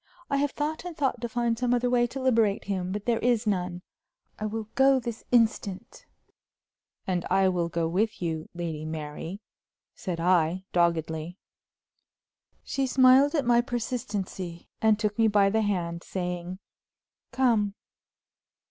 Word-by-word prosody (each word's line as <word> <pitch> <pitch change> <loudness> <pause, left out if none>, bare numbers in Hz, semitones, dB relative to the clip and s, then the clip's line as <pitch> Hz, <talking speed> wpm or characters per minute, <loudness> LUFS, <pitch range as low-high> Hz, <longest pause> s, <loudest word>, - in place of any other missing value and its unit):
I 280 - +2
have 285 +1 +1
thought 300 +3 -3
and 355 -3 -7
thought 265 -5 0
to 235 - -3
find 235 0 0
some 245 0 +2
other 245 0 +1
way 245 -1 +3
to 270 - -6
liberate 230 -6 +2
him, 185 -2 -2
but 205 +1 -4
there 235 -2 +1
is 240 -2 +1
none; 180 -3 -1 0.6
I 215 - -2
will 220 +1 -3
go 270 0 +5
this 235 -2 -6
instant." 225 -5 0 1.0
"And 180 -2 -1
I 190 +1 +4
will 175 -2 -1
go 165 0 -1
with 205 +6 0
you, 160 -2 -3
Lady 165 -3 -4
Mary," 155 +4 -6 0.5
said 180 -4 -5
I, 175 +1 +2
doggedly. 170 0 0 1.3
She 270 -1 -1
smiled 260 +4 +5
at 285 -4 +1
my 240 0 +5
persistency, 205 -8 -4
and 220 -1 +4
took 210 0 -2
me 225 - +5
by 200 -2 +4
the 220 +1 +2
hand, 175 -5 -1
saying, 180 0 -4 0.7
"Come!" 230 -6 +2
205 Hz, 150 wpm, -27 LUFS, 175-240 Hz, 1.3 s, go